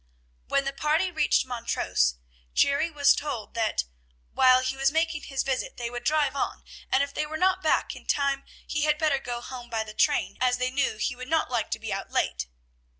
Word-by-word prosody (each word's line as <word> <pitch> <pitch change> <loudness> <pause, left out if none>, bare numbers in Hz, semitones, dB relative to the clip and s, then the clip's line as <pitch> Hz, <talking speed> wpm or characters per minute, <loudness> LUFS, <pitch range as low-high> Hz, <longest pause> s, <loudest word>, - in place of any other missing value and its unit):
When 275 - +1
the 275 - -2
party 310 +6 +1
reached 315 - +2
Montrose, 230 - 0 0.4
Jerry 280 +4 +3
was 290 -3 +4
told 250 -8 -4
that 225 -2 0 0.5
"while 255 0 +5
he 255 +1 -1
was 270 +1 +2
making 320 -1 0
his 270 -1 -2
visit 265 -2 -2
they 235 -1 -4
would 245 0 -5
drive 295 -3 +2
on, - - -2 0.3
and 265 +1 +4
if 280 0 -5
they 300 - -2
were 315 +1 -4
not 375 +2 +2
back 315 - +1
in - - -13
time 280 -1 +1 0.2
he 300 - -2
had 300 0 +2
better 300 -3 +2
go 240 -2 -5
home 245 -1 -8
by 225 -2 -1
the 215 -1 -10
train, 290 +6 +1
as 250 -1 +3
they 255 0 -1
knew 270 -4 0
he 250 - -1
would 255 +1 -8
not 320 -5 +1
like 235 -3 0
to - - -2
be - - -4
out - - -4
late." - - -1
275 Hz, 210 wpm, -27 LUFS, 245-300 Hz, 0.5 s, while